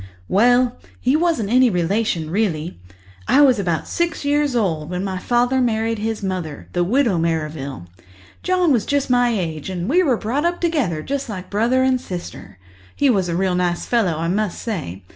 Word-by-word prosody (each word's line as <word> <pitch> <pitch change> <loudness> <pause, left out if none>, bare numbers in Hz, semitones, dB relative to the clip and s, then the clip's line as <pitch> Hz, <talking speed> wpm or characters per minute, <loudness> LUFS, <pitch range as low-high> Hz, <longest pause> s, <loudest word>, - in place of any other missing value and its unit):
"Well, 245 +4 +3 0.2
he 255 +3 +2
wasn't 315 - +1
any 255 0 +5
relation 180 -3 -1
really. 175 - -1 0.5
I 285 - +5
was 260 -6 +5
about 170 -5 -1
six 340 -3 -2
years 290 -2 +1
old 165 -9 -1
when 180 +1 -3
my 190 -2 -3
father 245 +5 +1
married 225 -2 0
his 220 0 -3
mother, 180 -6 -4
the 175 - +1
Widow 225 -2 +2
Merrivale. 155 - -3 0.6
John 365 -3 +2
was 240 -6 +1
just 285 -2 0
my 245 -1 +4
age, 170 -8 -3
and 180 -1 -4
we 345 +9 +3
were 270 -9 +2
brought 250 +9 -2
up 345 +1 0
together 270 - 0
just 275 -2 -3
like 185 -3 -7
brother 235 +5 +2
and 260 -1 +2
sister. 175 - -8 0.4
He 280 -2 +3
was 190 -5 0
a 170 - -1
real 190 -1 +1
nice 180 -1 -1
fellow, 225 -8 +1
I 165 +1 -2
must 205 +1 -1
say. 145 - -5
215 Hz, 180 wpm, -20 LUFS, 175-255 Hz, 0.6 s, any